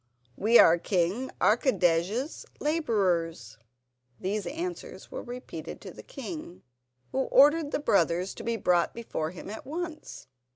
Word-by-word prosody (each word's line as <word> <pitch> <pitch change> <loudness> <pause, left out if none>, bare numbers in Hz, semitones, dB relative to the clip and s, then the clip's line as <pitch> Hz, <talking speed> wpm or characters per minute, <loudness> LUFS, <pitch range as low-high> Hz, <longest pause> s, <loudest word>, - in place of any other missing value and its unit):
"We 225 +4 +5
are 170 +1 +7
King 190 +8 0
Archidej's 215 - +2 0.2
labourers." 180 - 0 0.6
These 200 +1 -2
answers 345 +4 -6
were - - -5
repeated 250 +1 -8
to - - -8
the - - -11
king, 315 - -8 0.5
who 265 0 0
ordered 295 +2 +5
the - - 0
brothers 180 - +2
to - - -9
be 230 0 -1
brought 180 -4 +2
before 190 -9 -3
him 180 - -10
at 215 +2 -7
once. 325 +2 -6
220 Hz, 130 wpm, -28 LUFS, 175-290 Hz, 0.6 s, are